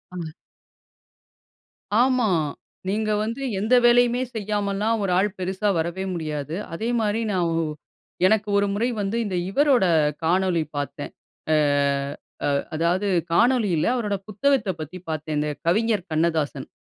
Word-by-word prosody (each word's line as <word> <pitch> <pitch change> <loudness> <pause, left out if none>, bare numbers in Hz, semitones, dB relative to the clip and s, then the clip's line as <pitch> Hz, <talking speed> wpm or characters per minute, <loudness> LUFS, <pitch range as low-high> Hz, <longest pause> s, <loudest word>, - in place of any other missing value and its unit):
அ. - - -5 1.8
ஆமா. 255 -4 +3 0.6
நீங்க 215 +1 0
வந்து 230 +5 -4 0.2
எந்த 220 +5 +3
வேலையுமே 245 +1 +4
செய்யாமல்லாம், 205 +1 -1
ஒரு 190 - 0
ஆள் 205 +2 +3
பெருசா 190 +3 -1
வரவே 170 +4 -2
முடியாது. 155 -2 -4 0.2
அதே 220 +7 -2
மாரி 215 +2 0
நான் 180 -3 +1
ஒ - - +1 0.6
எனக்கு 215 0 +2
ஒரு 200 0 +2
முறை 230 +4 0
வந்து, 200 +4 -1
இந்த 190 -3 -3
இவரோட 265 -2 +3 0.4
காணொளி 180 0 +2
பாத்தேன். 145 -1 -4 0.4
அ - - +5 0.9
ஆ. - - +2 0.3
அதாவது, 175 +5 +1 0.3
காணொளியில, 220 -7 +3
அவரோட 210 -4 -1
புத்தகத்தப் 210 - +1
பத்தி 160 +5 -7
பாத்தேங்க. 150 -1 -2
கவிஞர் 210 0 +1
கண்ணதாசன். 155 -4 0
200 Hz, 120 wpm, -24 LUFS, 170-225 Hz, 1.8 s, அ